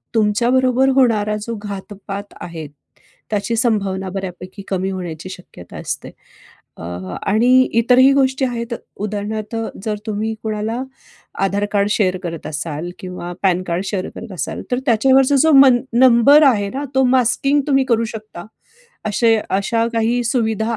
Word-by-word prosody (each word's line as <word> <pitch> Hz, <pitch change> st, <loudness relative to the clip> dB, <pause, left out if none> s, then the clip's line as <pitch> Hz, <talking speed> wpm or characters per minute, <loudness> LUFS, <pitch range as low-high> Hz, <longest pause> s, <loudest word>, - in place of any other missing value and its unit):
तुमच्याबरोबर 245 Hz, +5 st, +2 dB
होणारा 215 Hz, -4 st, +2 dB
जो 230 Hz, +2 st, -5 dB
घातपात 200 Hz, 0 st, -7 dB
आहे. 165 Hz, -3 st, -7 dB, 0.6 s
त्याची 210 Hz, +2 st, -1 dB
संभावना 200 Hz, -5 st, 0 dB
बऱ्यापैकी 185 Hz, +1 st, -7 dB
कमी 190 Hz, 0 st, -1 dB
होण्याची 180 Hz, -2 st, -6 dB
शक्यता 180 Hz, -, -11 dB
असते. -, -, -5 dB, 0.7 s
अ, -, -, -11 dB, 0.5 s
आणि 220 Hz, +5 st, +3 dB, 0.3 s
इतरही 255 Hz, +3 st, +5 dB
गोष्टी 265 Hz, 0 st, +2 dB
आहेत. 235 Hz, -1 st, -4 dB, 0.3 s
उदाहरणार्थ 215 Hz, +1 st, -4 dB, 0.3 s
जर 215 Hz, -1 st, -1 dB
तुम्ही 215 Hz, +1 st, -2 dB
कोणाला 220 Hz, +3 st, -2 dB, 0.6 s
आधार 200 Hz, +1 st, 0 dB
कार्ड 200 Hz, -1 st, +2 dB
शेअर 185 Hz, -4 st, +1 dB
करत 165 Hz, -2 st, -5 dB
असाल 155 Hz, +2 st, -4 dB
किंवा 180 Hz, -1 st, -7 dB
पॅन 185 Hz, -1 st, +2 dB
कार्ड 175 Hz, +1 st, -2 dB
शेअर 195 Hz, -2 st, -3 dB
करत 225 Hz, -3 st, -8 dB
असाल. 180 Hz, -, -4 dB
तर 250 Hz, -, +1 dB
त्याच्यावरचा 265 Hz, +4 st, +4 dB
जो 320 Hz, -, +4 dB
मन 270 Hz, -3 st, +7 dB
नंबर 260 Hz, +4 st, +6 dB
आहे 205 Hz, -6 st, +1 dB
ना? 275 Hz, +2 st, -3 dB
तो 265 Hz, -, +4 dB
मास्किंग 260 Hz, +3 st, +2 dB
तुम्ही 270 Hz, -2 st, +3 dB
करू 230 Hz, -3 st, +1 dB
शकता. 215 Hz, -5 st, -9 dB, 0.6 s
अशे 225 Hz, +2 st, +2 dB
अशा 225 Hz, +4 st, 0 dB
काही 230 Hz, +2 st, +1 dB
सुविधा 225 Hz, -1 st, 0 dB
215 Hz, 140 wpm, -19 LUFS, 195-245 Hz, 0.7 s, मन